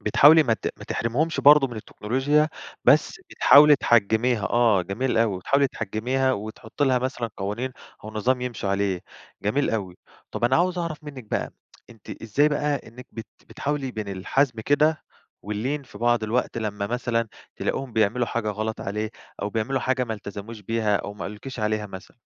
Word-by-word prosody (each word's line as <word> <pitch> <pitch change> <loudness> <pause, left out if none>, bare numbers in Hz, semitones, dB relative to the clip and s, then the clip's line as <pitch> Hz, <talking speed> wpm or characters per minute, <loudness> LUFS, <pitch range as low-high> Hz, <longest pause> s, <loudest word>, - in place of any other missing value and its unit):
بتحاولي 150 +9 +6
ما 115 -6 +2
ت - - -8
ما - - -9
تحرميهمش 145 +9 -1
برضو 145 -1 +7
من 120 -3 -9
التكنولوجيا 135 +8 0 0.4
بس - - +3
بتحاولي 150 +1 +7
تحجّميها، 115 -1 +2
آه 115 -5 +3
جميل 115 +7 -1
أوي، 110 -5 +1
بتحاولي 140 +9 +2
تحجّميها 130 +5 -1
وتحطي 110 +4 -4
لها 130 -2 +3
مثلًا 125 -3 -3
قوانين 105 +7 -3 0.3
أو 110 - -6
نظام 125 +4 0
يمشوا 120 -5 -4
عليه، 100 -2 0 0.4
جميل 130 +8 +1
أوي، 95 -5 -3 0.3
طب - - -3
أنا 120 +2 +4
عاوز 180 +1 +1
أعرف 165 -3 -4
منِك 140 -5 -8
بقى 105 - -3 0.4
أنتِ 115 -4 -11
إزاي 125 +7 +2
بقى 145 0 0
إنِك 125 +3 -12
بت 115 -1 -7 0.2
بتحاولي 140 -2 -3
بين 110 -4 -5
الحزم 115 +6 0
كده 150 +5 +2 0.4
واللين 120 +8 -3
في 115 -6 -14
بعض 120 0 +2
الوقت 115 +2 -1
لمّا 105 -2 -3
مثلًا 115 0 -1 0.3
تلاقيهم 135 -3 -3
بيعملوا 110 +3 +1
حاجة 115 -2 -2
غلط 110 +2 -4
عليه 105 +2 -3 0.3
أو 105 - -2
بيعملوا 115 +5 -1
حاجة 130 -1 0
ما 115 -2 -3
التزموش 105 +2 -8
بيها 110 0 0
أو 100 - -6
ما 105 - -8
قالولِكيش 120 +4 -7
عليها 105 0 -1
مثلًا؟ 95 +1 -11
115 Hz, 170 wpm, -24 LUFS, 105-135 Hz, 0.4 s, برضو